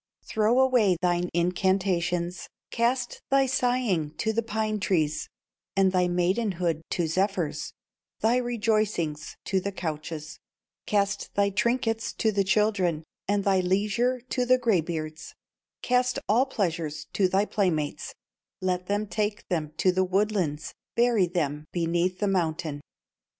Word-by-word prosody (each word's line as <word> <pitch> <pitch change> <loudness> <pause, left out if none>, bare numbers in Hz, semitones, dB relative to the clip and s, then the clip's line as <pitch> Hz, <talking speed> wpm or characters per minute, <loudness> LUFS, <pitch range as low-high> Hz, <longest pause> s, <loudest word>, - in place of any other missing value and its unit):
Throw 220 +3 +2
away 245 -9 +4
thine 175 0 +1
incantations, 180 0 0 0.2
Cast 245 +1 0
thy 275 0 +4
sighing 245 - 0
to 220 -1 -1
the 230 - +1
pine 215 -1 -2
trees, 155 -6 0 0.5
And 195 -1 +4
thy 180 -1 +2
maidenhood 175 -2 0
to 175 - 0
zephyrs, 185 -1 -1 0.5
Thy 230 +3 +3
rejoicings 215 -10 -1
to 195 - +1
the 200 +2 -3
couches, 155 -3 -5 0.5
Cast 200 -1 0
thy 200 0 +2
trinkets 230 +1 0
to 220 - +1
the 200 -1 +2
children, 190 -5 +1 0.2
And 205 0 +1
thy 195 -1 +3
leisure 210 +7 +1
to 250 +1 -2
the 255 +1 +4
gray 230 -8 +2
beards, 155 -1 -6 0.5
Cast 250 0 +2
all 245 +6 +3
pleasures 165 - -2
to 195 - +3
thy 195 +3 +2
playmates, 170 -9 -1 0.4
Let 180 -1 -1
them 205 +1 0
take 210 0 -2
them 155 -5 -1
to 185 - +3
the 185 +1 +2
woodlands, 185 -5 0 0.2
Bury 235 -5 +3
them 150 -3 -2
beneath 175 +1 0
the 205 - 0
mountain. 160 -5 -1
190 Hz, 135 wpm, -27 LUFS, 170-220 Hz, 0.5 s, away